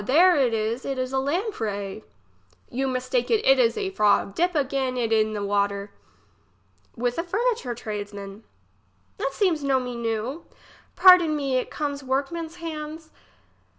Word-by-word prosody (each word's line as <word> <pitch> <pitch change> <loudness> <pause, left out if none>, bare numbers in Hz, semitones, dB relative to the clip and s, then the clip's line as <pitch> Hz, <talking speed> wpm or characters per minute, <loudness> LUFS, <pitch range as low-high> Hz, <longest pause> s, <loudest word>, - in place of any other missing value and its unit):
there 340 - +5
is, 230 -3 0
it 275 -1 -3
is 255 0 -3
a 265 - +2
lamprey. 225 - -3 0.7
You 270 +2 -1
mistake 260 - -1
you, 450 - +3
it - - +5
is 460 -2 +3
a 395 -3 -2
frog! 210 - +2
dip 350 - 0
again 265 -3 0
it 230 -2 0
in 215 0 +2
the 205 -1 -3
water. 200 0 -1 1.1
fTith 245 +4 -1
a - - 0
furniture 395 - -1
tradesman. 205 -2 -7 0.8
It 275 - -1
seems 330 -3 +1
no 270 -1 +2
me 250 -1 -5
new. 235 +6 -3 0.5
Pardon 360 -4 +7
me, 275 -3 0
it 255 - -2
comes 285 -2 -4
workman's 300 +5 -2
hands. 315 -1 -7
265 Hz, 150 wpm, -25 LUFS, 225-330 Hz, 1.1 s, Pardon